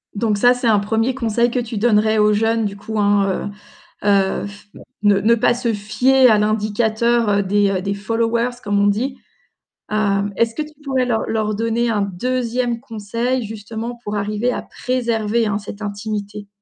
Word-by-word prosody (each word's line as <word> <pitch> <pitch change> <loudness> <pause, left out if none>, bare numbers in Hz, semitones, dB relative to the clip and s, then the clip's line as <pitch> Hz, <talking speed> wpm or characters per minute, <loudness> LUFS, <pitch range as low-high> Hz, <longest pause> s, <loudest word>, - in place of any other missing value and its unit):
Donc 210 -1 0
ça 245 +4 +5
c'est 245 -1 -2
un 210 -2 +4
1er 225 +5 0
conseil 235 -1 0
que 250 - 0
tu 230 -2 -4
donnerais 215 -1 +3
aux 210 0 +4
jeunes, 225 +1 +1
du 200 - -3
coup, 215 +2 -5
hein, 200 -2 +1 0.6
heu, - - -1
heu, 195 -1 +2
pff 205 0 -10 0.4
ne 205 -1 +4
ne 220 +4 +4
pas 235 +1 +2
se 235 -2 -1
fier 250 +5 +3
à 215 - +5
l'indicateur, 220 +2 +1
heu, 200 0 +2
des, 205 +1 +2
heu, 185 -1 -1
des 200 +1 -2
followers 230 +3 0
comme 205 -1 0
on 200 - +3
dit. 255 +6 0 0.7
Heu, 205 -1 +1
est-ce 230 -1 +1
que - - -4
tu 305 0 -11
pourrais 260 -2 0
leur 225 -3 0
leur 215 -1 -1
donner 230 +2 0
un 210 -3 +1
2e 240 +4 -1
conseil 230 +1 -3
justement 225 +3 -6
pour 210 - -4
arriver 210 +4 -1
à - - -3
préserver, 235 -3 -1
hein, 205 -1 0
cette 205 0 -9
intimité? 205 0 -5
220 Hz, 185 wpm, -19 LUFS, 205-235 Hz, 0.7 s, ça